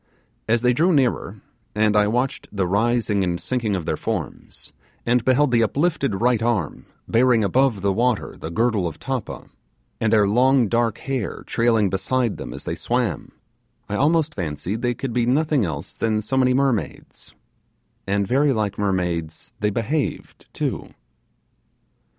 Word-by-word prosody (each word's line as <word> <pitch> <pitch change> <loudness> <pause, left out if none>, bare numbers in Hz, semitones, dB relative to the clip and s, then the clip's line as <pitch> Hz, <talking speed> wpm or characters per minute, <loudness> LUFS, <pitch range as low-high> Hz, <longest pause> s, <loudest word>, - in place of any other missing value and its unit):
As 115 +1 +2
they 125 0 +4
drew 165 +9 +3
nearer, 135 -6 0 0.3
and 105 0 +2
I 105 0 +4
watched 125 +5 -1
the 100 -3 -1
rising 105 +1 +1
and 85 -1 -1
sinking 115 -5 -1
of 90 -4 -4
their - - -1
forms, - - -5 0.3
and 120 0 +2
beheld 130 +2 +3
the 120 -1 +4
uplifted 140 - 0
right 120 -2 +3
arm 110 -9 -1 0.2
bearing 115 -1 +3
above 115 0 +2
the 100 -1 +2
water 120 +1 0
the 80 - -7
girdle 110 0 +1
of 80 - -7
tappa, 130 -3 -5 0.5
and 110 - +1
their 105 -3 +4
long 125 +3 +4
dark 115 +1 +1
hair 130 -6 -4
trailing 115 -4 +2
beside 115 +4 0
them - - -7
as - - -8
they - - -3
swam, - - -2 0.6
I - - -5
almost 155 +4 +2
fancied 90 - -4
they 120 -1 0
could 130 0 -4
be 120 -1 +1
nothing 145 -2 +2
else 80 - -5
than 110 -1 -1
so 120 +5 -2
many 130 -1 +3
mermaids 125 - -2 0.7
and 100 +1 +1
very 135 +6 +2
like 105 -3 -2
mermaids 90 -5 -2
they 105 - +1
behaved 125 +8 -3
too. - - -4
115 Hz, 155 wpm, -22 LUFS, 100-130 Hz, 0.7 s, they